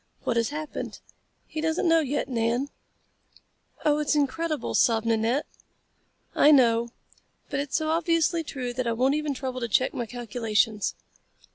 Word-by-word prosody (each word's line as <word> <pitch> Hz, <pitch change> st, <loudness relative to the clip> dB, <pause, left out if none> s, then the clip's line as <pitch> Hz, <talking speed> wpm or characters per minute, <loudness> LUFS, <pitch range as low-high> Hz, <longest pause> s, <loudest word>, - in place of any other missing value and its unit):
What 240 Hz, -, 0 dB
has 230 Hz, -1 st, +1 dB
happened? 305 Hz, +1 st, -5 dB, 0.5 s
He 310 Hz, -, -5 dB
doesn't 320 Hz, +2 st, 0 dB
know 330 Hz, 0 st, +5 dB
yet, 290 Hz, -2 st, -1 dB
Nan." 240 Hz, +2 st, 0 dB, 1.2 s
"Oh, 300 Hz, 0 st, +3 dB
it's 300 Hz, 0 st, +1 dB
incredible," 305 Hz, +2 st, -1 dB
sobbed 225 Hz, -2 st, +3 dB
Nanette. 230 Hz, +5 st, +1 dB, 0.9 s
"I 295 Hz, -, +5 dB
know, 235 Hz, -5 st, +5 dB, 0.6 s
but 280 Hz, -, -1 dB
it's 285 Hz, -1 st, -3 dB
so 315 Hz, -, -2 dB
obviously 330 Hz, 0 st, +2 dB
true 255 Hz, -5 st, -5 dB
that 255 Hz, 0 st, -2 dB
I 230 Hz, -, +1 dB
won't 255 Hz, +4 st, +2 dB
even 300 Hz, -1 st, -1 dB
trouble 255 Hz, -1 st, -4 dB
to 235 Hz, -, -2 dB
check 255 Hz, +4 st, +2 dB
my 240 Hz, -2 st, -3 dB
calculations." 225 Hz, -2 st, -1 dB
265 Hz, 150 wpm, -26 LUFS, 235-305 Hz, 1.2 s, know